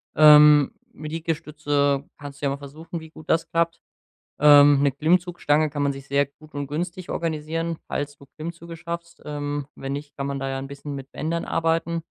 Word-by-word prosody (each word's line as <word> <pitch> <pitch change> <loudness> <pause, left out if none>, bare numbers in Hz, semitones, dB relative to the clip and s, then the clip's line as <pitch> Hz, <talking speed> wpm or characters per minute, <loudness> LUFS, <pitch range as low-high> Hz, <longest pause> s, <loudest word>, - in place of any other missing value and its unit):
ähm, 150 -1 +8 0.2
mit 155 +1 -8
Liegestütze 150 -3 -1
kannst 145 -1 -10
du - - -1
ja 140 - +2
mal 140 - -3
versuchen, 160 +5 -8
wie 160 - -12
gut 155 0 -15
das 165 0 +1
klappt. 170 0 0 0.6
Ähm, 145 -1 +7
ne 140 -1 +3
Klimmzugstange 155 0 +2
kann 145 0 -3
man 140 0 +1
sich 135 0 -10
sehr 140 +1 +3
gut 155 +2 -20
und 145 0 -3
günstig 170 +4 -4
organisieren, 165 0 -2
falls 145 0 -3
du 140 - -17
Klimmzüge 165 +1 -7
schaffst. 170 0 -7
Ähm, 145 -1 -4
wenn 135 0 -5
nicht, 145 +1 -6
kann 140 - -3
man 140 0 -3
da 135 0 -3
ja 135 0 -3
’n 135 +1 -6
bisschen 140 +1 -7
mit 135 -1 -8
Bändern 165 +2 -2
arbeiten. 165 0 0
150 Hz, 190 wpm, -24 LUFS, 140-165 Hz, 0.6 s, ähm